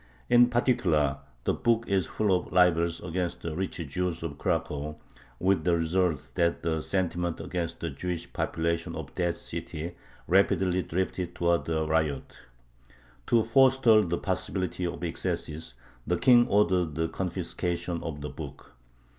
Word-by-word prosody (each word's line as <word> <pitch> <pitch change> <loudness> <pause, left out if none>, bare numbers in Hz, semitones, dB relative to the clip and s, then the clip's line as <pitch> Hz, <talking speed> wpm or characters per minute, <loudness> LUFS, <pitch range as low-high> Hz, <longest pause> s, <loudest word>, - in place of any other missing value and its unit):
In 120 0 +7
particular, 80 - +2 0.2
the - - +1
book 115 -1 +1
is 95 -4 +1
full 105 -3 +1
of 90 - -3
libels 85 -2 +3
against 90 0 -3
the 80 -2 -3
rich 95 +2 -3
Jews 85 +3 -2
of 75 -3 -5
Cracow, 75 +1 -1 0.4
with 95 +1 +2
the 85 -1 +3
result 85 -2 0
that 85 0 +1
the 80 -2 0
sentiment 90 -2 -1
against 85 -2 -4
the 85 - -2
Jewish 85 +4 -4
population 85 0 -1
of - - -7
that 85 -1 -1
city 85 +3 -6 0.3
rapidly 95 -1 +3
drifted 90 +1 -2
towards 85 -1 +1
a 80 -1 +1
riot. 75 -3 -1 0.9
To 115 -2 +4
forestall 125 -2 +5
the 85 -4 -1
possibility 90 -1 -2
of 85 - -6
excesses 80 -4 -4 0.3
the 90 - +1
King 120 +7 +6
ordered 90 -7 +2
the 80 +1 0
confiscation 90 -1 -3
of 75 -3 -5
the 75 - -4
book. - - -9
85 Hz, 145 wpm, -28 LUFS, 80-95 Hz, 0.9 s, In